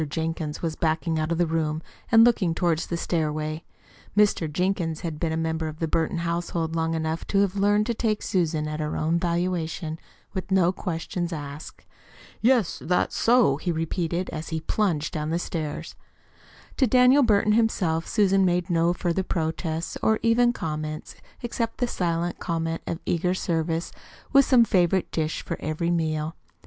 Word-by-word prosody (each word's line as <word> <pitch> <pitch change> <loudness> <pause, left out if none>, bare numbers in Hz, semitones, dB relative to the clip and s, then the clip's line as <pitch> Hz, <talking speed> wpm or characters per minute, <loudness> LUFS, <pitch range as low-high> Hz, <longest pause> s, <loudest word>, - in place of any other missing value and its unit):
Jenkins 160 0 -3
was 160 -2 -1
backing 160 0 0
out 155 +1 -1
of 170 - +1
the 175 - +3
room 160 -1 -1 0.3
and 225 0 +8
looking 205 -8 +3
toward 170 -3 +1
the 170 - -3
stairway. 155 -1 -2 0.5
Mr. 200 -7 +3
Jenkins 175 -1 -1
had 165 -4 -4
been 165 -2 -1
a 160 - -1
member 160 0 -1
of 155 0 -6
the 165 - -1
Burton 160 +2 0
household 170 -1 -2
long 165 0 0
enough 160 0 -2
to 195 - +2
have 200 -1 +1
learned 205 +1 +3
to 235 - 0
take 215 -2 -1
Susan 160 -4 0
at 155 0 -4
her 150 0 -2
own 165 +2 +1
valuation, 170 -2 -2 0.3
with 190 -2 -4
no 185 -2 +4
questions 175 -1 -3
asked. 145 -1 -7 0.6
"Yes, 235 -5 +2
that's 180 +1 +1
so," 230 - +4
he 175 - -2
repeated, 170 +2 -2
as 160 0 -5
he 160 -1 -2
plunged 160 -4 0
down 150 0 -2
the 165 - 0
stairs. 160 -3 -4 0.8
To 265 - +4
Daniel 255 +4 +6
Burton 210 -3 +3
himself 185 -8 +1
Susan 195 -2 +3
made 180 -1 +1
no 170 +1 +3
further 175 +1 -1
protests 160 -2 -3
or 220 0 +3
even 240 +1 +4
comments 155 -6 -5 0.3
except 230 -1 -2
the 245 - +1
silent 175 -5 -1
comment 165 -1 -2
of 165 - -3
eager 180 +2 +1
service 165 -2 -1 0.4
with 275 0 +7
some 245 -3 +5
favorite 185 -3 +2
dish 155 -1 -2
for - - -3
every 155 +2 -1
meal. 160 -1 -1
170 Hz, 170 wpm, -25 LUFS, 160-190 Hz, 0.8 s, and